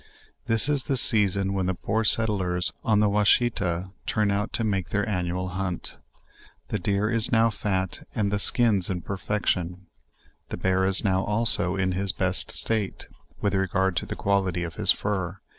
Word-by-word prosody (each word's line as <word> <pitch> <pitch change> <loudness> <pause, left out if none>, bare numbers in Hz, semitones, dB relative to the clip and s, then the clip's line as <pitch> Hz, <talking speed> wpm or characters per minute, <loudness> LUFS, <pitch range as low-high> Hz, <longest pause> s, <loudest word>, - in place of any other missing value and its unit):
This 115 -2 +2
is 145 -3 -1
the 135 -3 -1
season 100 -4 +3
when 95 -2 -1
the 95 - -1
poor 110 +6 -2
settlers 95 -6 +1
on 110 -2 +2
the 105 - +3
Washita 100 -3 +1 0.2
turn 105 -2 0
out 100 +2 -2
to 115 - -1
make 95 -5 -2
their 105 -1 -1
annual 90 -2 -3
hunt. 90 -1 -4 0.7
The - - -2
deer 100 +3 -1
is 115 -1 +3
now 115 -1 +3
fat 95 -3 -3
and 100 -2 -1
the 105 - 0
sldns 105 -3 +1
in 90 -2 -3
perfection; 95 -2 -3 0.6
the - - -5
bear 95 0 0
is 95 0 +1
now 95 -2 +1
also 105 -4 +6
in 95 -1 -1
his 95 0 -2
best - - 0
state, 110 -4 -2 0.4
with 100 -1 0
regard 95 -1 0
to - - -2
the - - -5
quality 95 -3 -1
of 85 - -6
his - - +3
fur. 95 -2 -3
100 Hz, 175 wpm, -25 LUFS, 95-105 Hz, 0.7 s, also